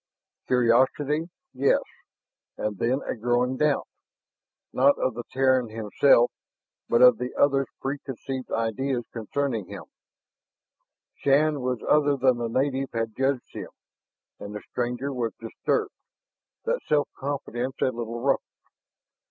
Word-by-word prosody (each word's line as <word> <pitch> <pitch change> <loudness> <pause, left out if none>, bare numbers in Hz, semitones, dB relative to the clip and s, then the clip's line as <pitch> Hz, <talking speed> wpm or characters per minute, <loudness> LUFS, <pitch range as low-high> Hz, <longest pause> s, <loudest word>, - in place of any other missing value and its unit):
Curiosity, 130 +6 +2 0.2
yes, 135 +2 +2 0.7
and 105 -2 -3
then 130 +4 +1
a - - -1
growing 120 +2 +1
doubt, 150 0 +1 0.9
not 140 +2 +4
of 130 - 0
the 120 - -5
Terran 130 -2 +2
himself, 115 +3 +3 0.6
but 120 - +5
of 125 -2 +7
the 125 0 -4
other's 135 -2 +3
preconceived 135 -1 -5
ideas 120 +3 -1
concerning 115 -2 -2
him. - - -8 1.4
Shann 145 +1 +3
was 125 -2 -2
other 145 -1 +4
than 130 -2 +3
the 115 -1 -2
native 135 +2 0
had 115 -1 -2
judged 135 -1 -1
him, - - -6 0.7
and 100 +1 -7
the 105 - -6
stranger 125 +3 -2
was 120 -3 -2
disturbed, 400 - -1 0.7
that - - 0
self 145 -2 +2
confidence 135 -2 -3
a - - +4
little 115 -1 -5
ruffled. 135 +2 +2
130 Hz, 125 wpm, -26 LUFS, 120-140 Hz, 1.4 s, of